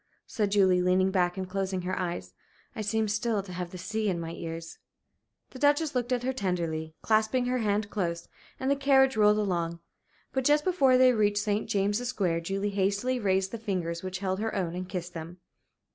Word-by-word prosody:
said 210 Hz, -4 st, -1 dB
Julie, 190 Hz, -3 st, +4 dB
leaning 185 Hz, +1 st, +3 dB
back 180 Hz, -1 st, +1 dB
and 190 Hz, -1 st, -3 dB
closing 190 Hz, -1 st, -2 dB
her 185 Hz, +1 st, -2 dB
eyes. 170 Hz, -, -4 dB, 0.4 s
"I -, -, -3 dB
seem 220 Hz, +1 st, 0 dB
still 210 Hz, 0 st, 0 dB
to 185 Hz, -2 st, -9 dB
have 180 Hz, -1 st, -4 dB
the 185 Hz, -, -9 dB
sea 215 Hz, +3 st, -2 dB
in 175 Hz, -3 st, -1 dB
my 165 Hz, 0 st, -5 dB
ears." 165 Hz, -1 st, -7 dB, 0.7 s
The 260 Hz, -, -10 dB
Duchess 290 Hz, +2 st, +3 dB
looked 250 Hz, -1 st, -1 dB
at 245 Hz, -1 st, 0 dB
her 260 Hz, +1 st, 0 dB
tenderly, 165 Hz, -7 st, -2 dB
clasping 220 Hz, +3 st, +2 dB
her 250 Hz, 0 st, 0 dB
hand 210 Hz, -1 st, 0 dB
close, 170 Hz, -4 st, -2 dB, 0.3 s
and 265 Hz, +1 st, 0 dB
the -, -, +4 dB
carriage 270 Hz, -2 st, +4 dB
rolled 210 Hz, -1 st, +5 dB
along. 170 Hz, -5 st, -1 dB, 0.6 s
But 265 Hz, -, 0 dB
just 295 Hz, +3 st, +4 dB
before 275 Hz, -9 st, +4 dB
they 255 Hz, 0 st, +6 dB
reached 205 Hz, -2 st, +2 dB
St. 205 Hz, 0 st, -1 dB
James's 205 Hz, +4 st, 0 dB
Square, 180 Hz, -9 st, 0 dB
Julie 195 Hz, +4 st, -2 dB
hastily 200 Hz, +6 st, 0 dB
raised 190 Hz, -2 st, +1 dB
the 230 Hz, -, -5 dB
fingers 175 Hz, -6 st, -2 dB
which 185 Hz, 0 st, -4 dB
held 190 Hz, 0 st, -2 dB
her 220 Hz, +1 st, -2 dB
own 180 Hz, -4 st, -1 dB
and 180 Hz, +1 st, -5 dB
kissed 180 Hz, -2 st, -5 dB
them. 165 Hz, +2 st, -7 dB
200 Hz, 200 wpm, -28 LUFS, 180-225 Hz, 0.7 s, they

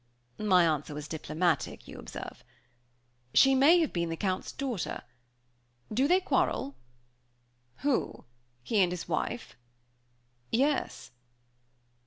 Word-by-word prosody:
My 185 Hz, -4 st, +4 dB
answer 150 Hz, -2 st, -1 dB
was 150 Hz, 0 st, -6 dB
diplomatic, 160 Hz, +2 st, -1 dB
you -, -, -9 dB
observe. -, -, -8 dB, 0.9 s
"She 270 Hz, 0 st, +7 dB
may 290 Hz, +7 st, +6 dB
have 320 Hz, -, -1 dB
been 170 Hz, -1 st, -1 dB
the 165 Hz, -, -3 dB
Count's 185 Hz, 0 st, -2 dB
daughter. 255 Hz, -9 st, -4 dB, 0.9 s
Do 260 Hz, +6 st, +3 dB
they 360 Hz, +4 st, +5 dB
quarrel?" 265 Hz, -, 0 dB, 1.1 s
"Who, 285 Hz, -4 st, 0 dB, 0.4 s
he 210 Hz, -, +2 dB
and 180 Hz, -2 st, +3 dB
his 180 Hz, -1 st, -5 dB
wife?" 205 Hz, +8 st, -3 dB, 1.0 s
"Yes." 275 Hz, +5 st, 0 dB
200 Hz, 110 wpm, -29 LUFS, 165-270 Hz, 1.1 s, She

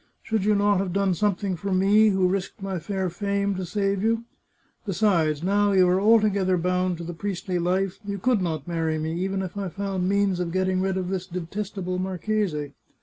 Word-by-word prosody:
Should 220 Hz, -3 st, -1 dB
you 210 Hz, 0 st, +4 dB
not 205 Hz, -1 st, +3 dB
have 190 Hz, -2 st, -2 dB
done 195 Hz, -1 st, +2 dB
something 200 Hz, 0 st, 0 dB
for 195 Hz, +4 st, -4 dB
me, 200 Hz, +4 st, +5 dB
who 190 Hz, -2 st, +2 dB
risked 195 Hz, +3 st, -2 dB
my 195 Hz, -2 st, -3 dB
fair 190 Hz, +3 st, -2 dB
fame 200 Hz, +2 st, -1 dB
to 185 Hz, -1 st, -4 dB
save 195 Hz, +1 st, 0 dB
you? 225 Hz, +2 st, +1 dB, 0.6 s
Besides, 170 Hz, -7 st, +1 dB
now 200 Hz, +2 st, +2 dB
you 185 Hz, -1 st, +5 dB
are 180 Hz, +2 st, +2 dB
altogether 205 Hz, -4 st, +3 dB
bound 180 Hz, 0 st, 0 dB
to 170 Hz, -, -7 dB
the 175 Hz, +1 st, -5 dB
priestly 185 Hz, 0 st, -3 dB
life, 185 Hz, +2 st, 0 dB
you 200 Hz, -1 st, -4 dB
could 235 Hz, +1 st, +1 dB
not 160 Hz, -4 st, -3 dB
marry 165 Hz, -2 st, -1 dB
me, 160 Hz, +1 st, -2 dB
even 190 Hz, 0 st, -1 dB
if 185 Hz, 0 st, -6 dB
I 200 Hz, -2 st, -3 dB
found 190 Hz, -1 st, -2 dB
means 200 Hz, -2 st, +1 dB
of 175 Hz, -2 st, -2 dB
getting 185 Hz, 0 st, +1 dB
rid 190 Hz, 0 st, 0 dB
of 185 Hz, -1 st, -2 dB
this 185 Hz, -1 st, -3 dB
de 180 Hz, 0 st, -4 dB
testable 185 Hz, 0 st, -4 dB
marchese. 185 Hz, -5 st, -2 dB
190 Hz, 205 wpm, -25 LUFS, 180-200 Hz, 0.6 s, me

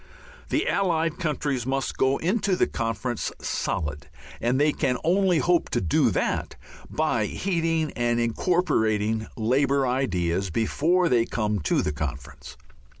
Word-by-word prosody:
The -, -, 0 dB
Allied 165 Hz, -4 st, 0 dB
countries 145 Hz, -6 st, -1 dB
must 135 Hz, 0 st, -1 dB
go 130 Hz, +1 st, +2 dB
into 195 Hz, +2 st, 0 dB
the -, -, +3 dB
conference 115 Hz, +1 st, -3 dB
solid, 75 Hz, -1 st, -3 dB, 0.3 s
and 125 Hz, +3 st, +1 dB
they 150 Hz, +1 st, +4 dB
can 130 Hz, -4 st, 0 dB
only 185 Hz, +1 st, +3 dB
hope 175 Hz, +2 st, +2 dB
to -, -, 0 dB
do 80 Hz, -5 st, +2 dB
that -, -, -1 dB, 0.3 s
by 120 Hz, -9 st, 0 dB
heeding 165 Hz, -, -1 dB
and 120 Hz, 0 st, 0 dB
incorporating 110 Hz, -, +1 dB
Labour 135 Hz, +4 st, +2 dB
ideas 95 Hz, -8 st, 0 dB
before 160 Hz, -, +1 dB
they 120 Hz, -4 st, +2 dB
come 105 Hz, -2 st, -1 dB
to 75 Hz, -, +1 dB
the 75 Hz, -, -1 dB
conference. 70 Hz, -1 st, -6 dB
130 Hz, 135 wpm, -25 LUFS, 110-160 Hz, 0.3 s, they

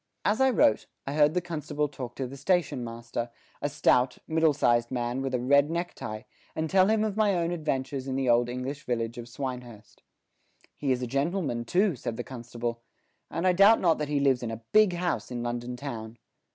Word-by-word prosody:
As 215 Hz, +5 st, +2 dB
I 265 Hz, -, +6 dB
wrote, 155 Hz, -, +3 dB, 0.2 s
I 140 Hz, -, -3 dB
heard 150 Hz, +2 st, +4 dB
the 180 Hz, -, +2 dB
constable 150 Hz, -3 st, -2 dB
talk 130 Hz, -4 st, -7 dB
to 135 Hz, -, -3 dB
the 130 Hz, +2 st, -8 dB
station 145 Hz, -3 st, 0 dB
master, 115 Hz, 0 st, -5 dB, 0.3 s
a 145 Hz, -, 0 dB
stout, 125 Hz, -2 st, +2 dB
middle 160 Hz, -1 st, +3 dB
sized 120 Hz, -4 st, +2 dB
man 125 Hz, 0 st, -2 dB
with 135 Hz, -1 st, -1 dB
a -, -, 0 dB
red 140 Hz, +4 st, +4 dB
neck 170 Hz, +2 st, -2 dB
tie, 110 Hz, +2 st, -7 dB, 0.3 s
and 160 Hz, 0 st, -1 dB
tell 190 Hz, +3 st, +4 dB
him 215 Hz, 0 st, +2 dB
of 215 Hz, -2 st, -1 dB
my 210 Hz, -3 st, +3 dB
own 170 Hz, -1 st, 0 dB
adventures 135 Hz, -5 st, -2 dB
in 130 Hz, -, -2 dB
the 135 Hz, -1 st, 0 dB
old 120 Hz, 0 st, +4 dB
English 130 Hz, +3 st, -4 dB
village 115 Hz, -1 st, -2 dB
of 120 Hz, 0 st, -8 dB
Swinehurst. 125 Hz, -4 st, -7 dB, 0.7 s
"He 140 Hz, -2 st, -1 dB
is 125 Hz, 0 st, 0 dB
a -, -, 0 dB
gentleman 140 Hz, -1 st, -1 dB
too," 185 Hz, -, +2 dB
said 115 Hz, -2 st, -5 dB
the 120 Hz, -, -3 dB
constable, 120 Hz, -2 st, -5 dB, 0.5 s
"and 170 Hz, -, -2 dB
I 185 Hz, -, +5 dB
doubt 200 Hz, +5 st, +6 dB
not 165 Hz, -4 st, +3 dB
that 150 Hz, -1 st, -2 dB
he 145 Hz, -1 st, +1 dB
lives 135 Hz, -3 st, +3 dB
in 120 Hz, -, -3 dB
a 115 Hz, 0 st, -6 dB
big 215 Hz, -3 st, +5 dB
house 175 Hz, 0 st, -2 dB
in 120 Hz, -1 st, -4 dB
London 120 Hz, +1 st, -3 dB
town." 115 Hz, -4 st, -6 dB
135 Hz, 210 wpm, -28 LUFS, 120-165 Hz, 0.7 s, I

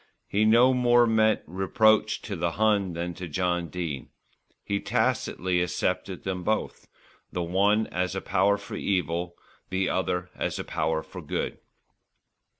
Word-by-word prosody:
He 105 Hz, +2 st, +2 dB
no 120 Hz, +4 st, +6 dB
more 120 Hz, -1 st, +4 dB
meant 110 Hz, -1 st, +3 dB
reproach 100 Hz, +5 st, +2 dB
to -, -, -4 dB
the -, -, -1 dB
Hun 105 Hz, -3 st, +2 dB
than 85 Hz, +1 st, -3 dB
to 90 Hz, +1 st, -7 dB
John 90 Hz, +1 st, -1 dB
Dene. 80 Hz, -6 st, -5 dB, 0.5 s
He 100 Hz, 0 st, -1 dB
tacitly 90 Hz, -2 st, 0 dB
accepted 90 Hz, -, -2 dB
them 95 Hz, -1 st, -3 dB
both, 110 Hz, +4 st, -2 dB, 0.4 s
the 90 Hz, -, -2 dB
one 100 Hz, +5 st, +2 dB
as 90 Hz, +1 st, -2 dB
a -, -, -1 dB
power 100 Hz, +1 st, +2 dB
for 100 Hz, -, -10 dB
evil, 85 Hz, -2 st, -1 dB, 0.3 s
the 95 Hz, +1 st, 0 dB
other 90 Hz, -1 st, -1 dB
as -, -, -3 dB
a -, -, -3 dB
power 80 Hz, 0 st, -1 dB
for -, -, -9 dB
good. -, -, -3 dB
95 Hz, 150 wpm, -27 LUFS, 90-105 Hz, 0.5 s, no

